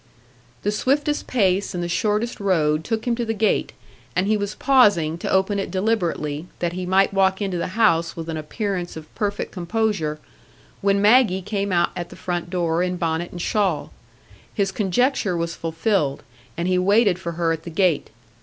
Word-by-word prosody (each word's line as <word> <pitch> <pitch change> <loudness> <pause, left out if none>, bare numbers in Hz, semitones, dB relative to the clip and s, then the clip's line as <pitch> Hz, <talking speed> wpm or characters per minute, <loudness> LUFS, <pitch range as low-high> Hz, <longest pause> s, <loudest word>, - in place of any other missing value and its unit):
The 205 - +1
swiftest 290 +7 0
pace 195 -4 +1
and 175 - -2
the - - -2
shortest 210 +7 0
road 160 -6 +1
took 225 +2 -2
him 240 -1 +1
to 240 - -1
the 225 -1 -2
gate, 215 0 +1 0.4
and 180 - +2
he 215 +2 +2
was 205 0 -3
pausing 205 - +4
to - - -3
open 190 +2 +2
it 195 - -3
deliberately, 175 -6 -1
that 175 -1 -2
he 180 0 -4
might 195 +2 +3
walk 190 -1 +2
into 190 -4 -2
the 185 +4 -4
house 170 -7 +3
with 165 -1 -6
an 165 - -3
appearance 180 +2 -3
of 155 -1 -11
perfect 205 -1 -2
composure, 180 -4 -1 0.6
when 200 0 +2
Maggie 210 -4 +5
came 200 0 -2
out 175 -1 +2
at 175 -1 -5
the - - -11
front 175 -1 -3
door 170 -2 0
in 180 0 -1
bonnet 165 0 -1
and 175 -1 -6
shawl. 195 -7 0 0.6
His 195 -3 0
conjecture 205 -1 +1
was 170 0 -2
fulfilled, 165 -2 -1 0.3
and 170 - -1
he 185 0 +2
waited 200 0 +3
for 170 -2 -4
her 165 0 0
at 160 -1 -2
the 170 - -8
gate. 170 -2 +1
185 Hz, 185 wpm, -22 LUFS, 170-210 Hz, 0.6 s, Maggie